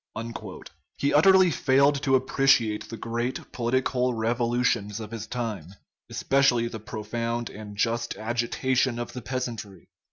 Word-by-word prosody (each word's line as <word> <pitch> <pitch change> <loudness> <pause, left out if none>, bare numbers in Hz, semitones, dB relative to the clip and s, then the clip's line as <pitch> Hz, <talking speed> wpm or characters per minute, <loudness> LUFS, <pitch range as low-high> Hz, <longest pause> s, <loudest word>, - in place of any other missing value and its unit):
He 140 - +1
utterly 185 +3 +6
failed 140 +1 +3
to 135 -2 +3
appreciate 130 -4 +2
the 115 - -6
great 120 +3 -3
political 125 +1 0
revolu 120 +2 0
tions 105 -2 0
of 110 -1 -7
his 110 -1 -6
time, 105 -8 -5 0.3
especially 130 -4 +2
the 115 -1 -6
profound 115 +2 -4
and 105 -1 -9
just 115 +2 0
agi 120 +2 -2
tation 130 -2 +1
of 120 - -5
the 125 - -6
peasantry. 115 - -5
120 Hz, 135 wpm, -26 LUFS, 110-130 Hz, 0.3 s, utterly